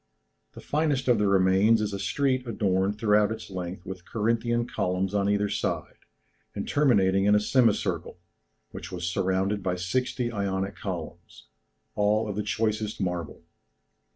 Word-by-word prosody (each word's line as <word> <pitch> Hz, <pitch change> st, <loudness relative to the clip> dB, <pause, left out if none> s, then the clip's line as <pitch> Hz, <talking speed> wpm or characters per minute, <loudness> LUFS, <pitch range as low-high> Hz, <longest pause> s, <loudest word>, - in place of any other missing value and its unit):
The -, -, -11 dB
finest 145 Hz, -3 st, 0 dB
of 120 Hz, -3 st, +4 dB
the 105 Hz, -, +2 dB
remains 100 Hz, +3 st, +4 dB
is 105 Hz, -1 st, -2 dB
a 100 Hz, -, -3 dB
street 130 Hz, +4 st, 0 dB
adorned 100 Hz, -2 st, 0 dB
throughout 105 Hz, -1 st, +3 dB
its 110 Hz, -, -7 dB
length 90 Hz, -1 st, -6 dB
with 95 Hz, -2 st, -7 dB
Corinthian 115 Hz, +3 st, 0 dB
columns 95 Hz, -4 st, -1 dB
on 100 Hz, -1 st, +1 dB
either 105 Hz, 0 st, +2 dB
side, -, -, -2 dB, 0.6 s
and -, -, -4 dB
terminating 100 Hz, -9 st, +3 dB
in 105 Hz, +1 st, +5 dB
a -, -, +5 dB
semicircle, 115 Hz, -4 st, +1 dB, 0.5 s
which -, -, -8 dB
was 90 Hz, -1 st, -4 dB
surrounded 95 Hz, +3 st, 0 dB
by 90 Hz, -2 st, -1 dB
sixty 120 Hz, +6 st, -1 dB
Ionic 100 Hz, -2 st, -2 dB
columns, 85 Hz, -4 st, -7 dB, 0.4 s
all 105 Hz, +1 st, +1 dB
of 105 Hz, -, -4 dB
the 105 Hz, -, -1 dB
choicest 110 Hz, 0 st, -1 dB
marble. 90 Hz, -5 st, -3 dB
105 Hz, 150 wpm, -27 LUFS, 95-115 Hz, 0.6 s, in